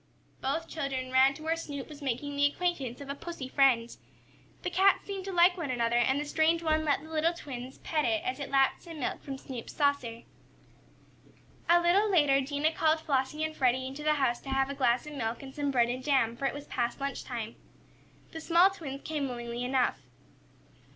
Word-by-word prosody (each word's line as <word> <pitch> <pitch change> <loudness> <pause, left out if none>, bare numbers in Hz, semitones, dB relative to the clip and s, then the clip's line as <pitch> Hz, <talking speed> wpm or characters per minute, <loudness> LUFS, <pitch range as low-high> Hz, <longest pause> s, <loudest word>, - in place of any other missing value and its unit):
Both 320 +5 -1
children 270 -4 -3
ran 265 +1 +5
to 310 - -10
where 320 +1 +1
Snoop 285 -4 -6
was 300 -1 -11
making 280 +2 -3
the 285 0 +4
acquaintance 285 -6 -2
of 280 - -9
a - - -2
pussy 290 -2 -7
friend. 255 -4 +3 0.7
The 360 - -2
cats 385 +3 +4
seemed 390 -2 -5
to 390 - -4
like 355 0 +5
one 325 -6 -3
another 235 -1 +1
and 265 +3 +2
the 295 - -3
strange 320 +3 +2
one 315 -1 +2
let 285 -1 +1
the 315 - -12
little 320 +2 +2
twins 255 -4 -8
pet 310 -2 -1
it 330 +1 +1
as 375 -4 -2
it 280 -1 -5
lapped 270 -1 +2
some 330 -3 -9
milk 255 - -3
from 275 -1 -6
Snoop's 255 -3 -8
saucer. 280 -6 0 1.5
A 345 +1 +7
little 380 +5 +3
later 290 -7 +4
Dinah 290 +3 0
called 315 0 +2
Flossie 280 +2 0
and 315 0 -2
Freddie 260 -1 +2
into 270 +3 -6
the 305 0 +2
house 260 -4 0
to 275 - -9
have 270 0 +1
a - - -3
glass 255 -1 +1
of 300 - -8
milk 230 -2 -3
and 265 -1 -9
some 290 0 -1
bread 240 -3 +3
and 255 +1 -3
jam, 260 -5 +2
for 275 - -4
it - - -2
was 290 0 -7
past 240 +1 -2
lunch 275 0 -3
time. 230 -3 -5 0.8
The 320 - -7
small 345 +4 +5
twins 285 -8 -7
came 295 -4 -2
willingly 240 0 -5
enough. 250 - +1
280 Hz, 210 wpm, -30 LUFS, 260-315 Hz, 1.5 s, A